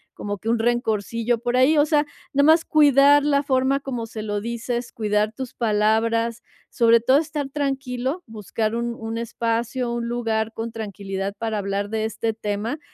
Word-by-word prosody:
como 205 0 -4
que 220 - -10
un 235 - +2
rencorcillo 230 0 0
por 245 +1 -1
ahí. 270 +5 +4
O 290 - +5
sea, 300 -1 +2 0.3
nomás 310 +4 +5
cuidar 285 -1 +5
la 285 -1 +3
forma 270 0 +1
como 245 -4 -4
se 225 -1 -7
lo 205 -1 -2
dices, 235 +2 -3
cuidar 210 0 0
tus 260 +1 -7
palabras, 225 +1 +1 0.3
sobre 230 0 +4
todo 260 +4 +4
estar 295 -2 -2
tranquilo, 270 +2 -2
buscar 220 0 -3
un 235 0 -2
un 225 0 -5
espacio, 235 +1 -2
un 235 0 -3
lugar 225 -2 -1
con 225 +1 -5
tranquilidad 200 -3 -5
para 225 -1 -2
hablar 200 0 -2
de 220 0 -1
este 225 +1 -2
tema, 215 +5 -3
235 Hz, 165 wpm, -23 LUFS, 220-260 Hz, 0.3 s, O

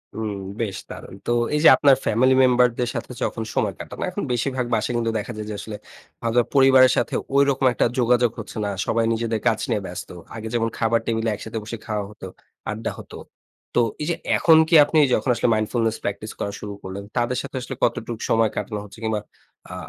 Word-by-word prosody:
হুম, 110 -2 -3 0.3
বেশ 100 -5 -2
দারুণ। - - -9
তো - - +1 0.2
এই - - +2
যে, - - +9
আপনার 140 -2 +6
ফ্যামিলি 130 +4 +3
মেম্বারদের 125 -1 +3
সাথে - - -5
যখন 115 - -2
সময় - - +1
কাটান। - - -9
এখন - - -4
বেশিরভাগ 125 +1 -1
বাসায় 110 +3 -1
কিন্তু 115 -1 0
দেখা 115 +3 -6
যায় 105 0 -5
যে, 105 - -4
আসলে 105 -2 -7 0.8
পরিবারের 130 -1 +6
সাথে 120 - 0 0.2
ঐরকম 140 -1 +3
একটা - - +2
যোগাযোগ 120 -1 +3
হচ্ছে 110 - -8
না। - - -1 0.2
সবাই 115 0 +1
নিজেদের 115 -1 -1
কাজ 110 -1 +2
নিয়ে 105 - 0
ব্যস্ত। 90 - -7 0.3
আগে 110 0 -6
যেমন, 115 -1 +1
খাবার 115 0 +2
টেবিলে 115 0 0
একসাথে 110 +2 -5
বসে 115 +2 -6
খাওয়া 105 -2 -2
হতো, 105 -3 -9 0.4
আড্ডা 110 +1 -3
হত। - - -12 0.6
তো - - +4 0.2
এই - - -1
যে, 170 - +1 0.2
এখন 160 -2 +6
কি 170 - +5
আপনি 155 - +2
যখন 130 - +1
আসলে 120 - +1
mindfullness 115 +1 0
practice 105 +2 -4
করা 100 - -3
শুরু 105 -1 -6
করলেন, 95 +1 -6
তাদের 120 +1 0
সাথে - - -8
আসলে 130 +1 -6
কতটুকু 115 -1 -1
সময় 115 -1 +3
কাটানো 105 0 -3
হচ্ছে, 100 +2 -14
কিংবা 110 -2 -1 0.5
আ - - -6
115 Hz, 195 wpm, -23 LUFS, 110-125 Hz, 0.8 s, যে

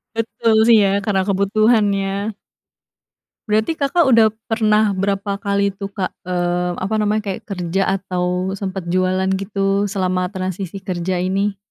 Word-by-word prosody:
Betul, 225 0 0
sih, 230 -1 +7
ya, - - +3 0.2
karena 195 -3 +1
kebutuhan, 210 +3 +3 0.2
ya. 200 +2 -3 1.2
Berarti 220 +9 +2
Kakak 310 +3 +1
udah 230 -4 +5 0.2
pernah 215 -2 +2
berapa 195 +1 -2
kali, 200 -1 0
tuh, 195 0 -6
Kak? 195 -2 -4
Eee, 175 0 -1
apa 195 +4 -2
namanya, 210 -1 0
kayak 205 - -11
kerja 195 +1 0
atau 180 0 -2
sempet 190 -2 -5
jualan 185 0 +1
gitu 195 +1 0
selama 185 -2 -1
transisi 185 -1 -4
kerja 185 -2 -3
ini. 195 +3 0
195 Hz, 140 wpm, -19 LUFS, 185-210 Hz, 1.2 s, sih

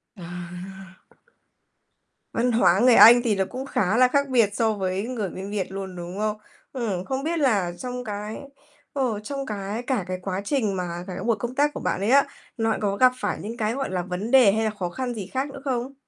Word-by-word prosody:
À. 180 +2 -9 1.4
Văn 245 +1 +1
hóa 200 -5 +4
người 245 0 +6
Anh 240 +2 +9
thì 220 -4 +2
nó 190 - +1
cũng 260 +1 -5
khá 210 -4 0
là 255 0 +6
khác 280 +2 +1
biệt 230 -5 +4
so 225 -2 +2
với 190 0 -2
người 220 -7 -3
bên 190 +2 -7
Việt 195 -2 -3
luôn, 190 -1 -6
đúng 175 +2 -7
không? 215 0 -1 0.3
Ừm, 205 -8 -3
không 265 +1 -3
biết 330 +1 -1
là 205 -11 +2
trong 250 0 -5
cái, 210 0 -5 0.6
ờ, 250 -7 -1
trong 275 +5 -5
cái 210 +1 -4
cả 245 -7 -1
cái 185 0 -3
quá 190 +1 -3
trình 220 -8 0
mà 175 -1 -4
cả 185 - -5
cái - - -5
buổi 230 -1 +2
công 240 +3 -4
tác 290 +1 +2
của - - -5
bạn - - -1
ấy 205 - 0
á, 275 +1 +6 0.3
nó 225 -1 +1
có 200 -1 0
gặp 255 0 +6
phải - - -1
những 230 +4 -6
cái, 220 0 0
gọi 270 -3 -3
là, 180 -1 -1
vấn 185 +6 -4
đề 250 -7 +7
hay 220 +1 0
là 215 - 0
khó 180 -1 -1
khăn 250 +5 -4
gì 205 -4 -6
khác 265 +5 -2
nữa 275 - -10
không? 260 0 -2
215 Hz, 230 wpm, -24 LUFS, 190-250 Hz, 1.4 s, Anh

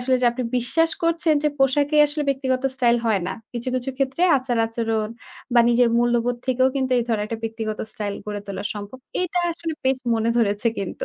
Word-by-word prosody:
আসলে 255 +1 +2
যে - - +5
আপনি 250 +1 -3
বিশ্বাস 325 +7 +2
করছেন 335 -1 +2
যে - - +5
পোশাকই 285 +3 +3
আসলে 295 +1 -3
ব্যক্তিগত 260 -1 0
স্টাইল 240 -2 +3
হয় 210 -4 +2
না। - - -2 0.2
কিছু, 240 +1 -4
কিছু 255 +1 -2
ক্ষেত্রে 270 +4 -1
আচার 255 -2 -1
আচরণ 225 -1 -1 0.5
বা, 240 - +7
নিজের 240 0 +4
মূল্যবোধ 240 0 +1
থেকেও 260 0 +3
কিন্তু 260 -1 0
এই 240 - 0
ধরনের 215 -3 0
একটা 230 - -4
ব্যক্তিগত 220 -1 -4
স্টাইল 205 -2 -4
গড়ে 210 -1 -4
তোলা 200 0 -5
সম্ভব। 205 +5 -8 0.2
এটা 360 0 -1
আসলে 330 -1 -5
বেশ 265 0 +3 0.2
মনে 225 +1 +1
ধরেছে 210 0 +2
কিন্তু। 195 -2 -4
245 Hz, 195 wpm, -23 LUFS, 225-270 Hz, 0.5 s, বা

